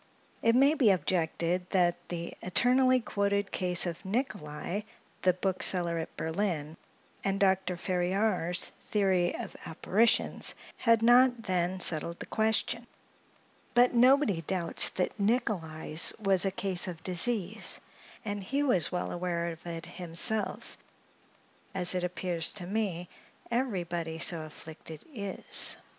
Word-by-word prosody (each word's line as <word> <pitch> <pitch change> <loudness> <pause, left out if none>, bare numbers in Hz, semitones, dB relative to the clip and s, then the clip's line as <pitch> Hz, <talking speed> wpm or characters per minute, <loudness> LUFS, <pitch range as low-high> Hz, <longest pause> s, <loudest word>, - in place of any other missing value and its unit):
It 230 +1 +2
may 275 +4 +4
be 260 -8 +2
objected 180 -1 -1
that 175 -2 -1
the 170 -1 -5
eternally 255 +6 +2
quoted 200 -2 -2
case 180 -1 0
of 170 0 -6
Nicolai, 195 - -4 0.4
the 185 - +2
bookseller 180 -2 -1
at 160 - -8
Berlin, 160 -3 -3 0.5
and 195 0 -2
Dr. 190 -2 0
Ferriar's 180 0 0 0.2
"Theory 190 -4 0
of - - -8
Apparitions," 215 +8 0 0.2
had 230 -1 +2
not 245 0 +4
then 185 -1 -2
settled 170 0 0
the - - -7
question; 220 +2 -2 0.9
but 245 +1 +4
nobody 250 - +3
doubts 170 +1 +3
that 185 +3 -4
Nicolai's 180 -8 +2
was 195 -3 +1
a 195 - 0
case 190 -2 0
of 170 -3 -8
disease; 200 +3 -1 0.5
and 205 -1 -4
he 275 +9 -2
was 220 - +3
well 180 -1 -4
aware 175 -1 -3
of 165 0 -12
it 165 -1 -6
himself, 175 +5 0 1.0
as 180 -1 +6
it 180 -1 -2
appears 180 -2 0
to 185 -4 -4
me, 190 -3 -3 0.4
everybody 175 -9 -3
so 165 0 +4
afflicted, 155 0 -10
is. 200 -5 +8
185 Hz, 125 wpm, -28 LUFS, 175-215 Hz, 1.0 s, is